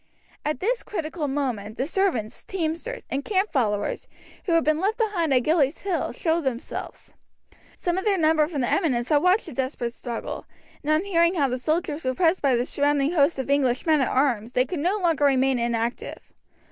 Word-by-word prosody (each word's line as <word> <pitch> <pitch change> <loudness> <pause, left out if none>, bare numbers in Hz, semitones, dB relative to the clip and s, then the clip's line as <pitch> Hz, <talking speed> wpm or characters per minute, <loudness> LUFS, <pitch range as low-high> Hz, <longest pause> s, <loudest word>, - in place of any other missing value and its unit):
At 300 -3 -2
this 480 +5 0
critical 320 -4 -4
moment 245 -7 -3
the 260 - 0
servants, 315 - -1
teamsters, 345 +6 -3
and 275 +1 -1
camp 395 +3 0
followers 210 -8 -1 0.4
who 345 - +1
had 330 - +4
been 310 0 +2
left 405 +5 0
behind 390 - 0
Gillies 305 -1 +2
Hill, 385 -3 -1
showed 330 -1 0
themselves. 260 -4 -5 0.6
Some 350 +1 -1
of - - -5
their 410 -2 +2
number 310 -2 +3
from 300 -4 -3
the 245 - 0
eminence 255 -9 +1
had 300 - +5
watched 365 +5 +3
the - - -8
desperate 255 -2 -3
struggle, 235 -1 -6 0.3
and 300 - -1
on 310 +3 +3
hearing 340 -2 +2
how 285 -5 +2
their 250 - -1
soldiers 310 +2 -1
were 255 0 -1
pressed 345 +3 +2
by 275 -3 +3
the 240 +1 0
surrounding 285 +1 +1
host 305 -2 +3
of 265 - -3
English 260 -3 +1
men 310 -3 +4
at 260 - +2
arms 245 -4 0
they 250 - +3
could 350 +2 -4
no 360 +7 +1
longer 335 -7 +1
remain 265 -2 +3
inactive. 235 0 -3
300 Hz, 195 wpm, -25 LUFS, 260-345 Hz, 0.6 s, had